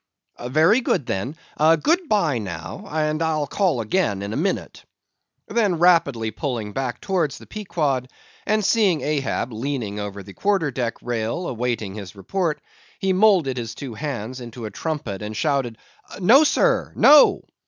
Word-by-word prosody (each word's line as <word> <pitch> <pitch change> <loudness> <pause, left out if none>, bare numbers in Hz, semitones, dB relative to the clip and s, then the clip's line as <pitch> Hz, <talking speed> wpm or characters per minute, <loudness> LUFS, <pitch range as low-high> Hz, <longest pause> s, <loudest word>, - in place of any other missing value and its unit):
"Very 160 - +3
good, 145 - 0
then; 120 +5 -3 0.2
good 165 - +3
bye 165 - +2
now, 100 - -7
and 155 0 0
I'll 155 -2 0
call 165 - 0
again 105 - 0
in 100 +1 -4
a - - -3
minute." - - -2 0.6
Then 205 -5 +1
rapidly 145 -10 +3
pulling 110 -3 -4
back 130 -3 -3
towards 175 -7 -1
the - - -13
Pequod, 150 -11 -2 0.4
and 215 -1 +1
seeing 195 -8 +3
Ahab 140 -4 -1
leaning 115 -4 -3
over 100 -1 -6
the 100 +1 -12
quarter 195 - 0
deck 120 -2 -3
rail 120 +8 -2
awaiting 115 -4 -2
his 100 -2 -8
report, 165 - -2 0.4
he 195 -2 0
moulded 185 -10 +3
his 115 -1 -5
two 135 -4 -7
hands 130 -2 -5
into 120 -1 -8
a 105 - -6
trumpet 125 -7 -4
and 105 0 -5
shouted—"No, 145 - +1
Sir! - - +2
No!" 295 0 +6
140 Hz, 150 wpm, -22 LUFS, 115-180 Hz, 0.6 s, No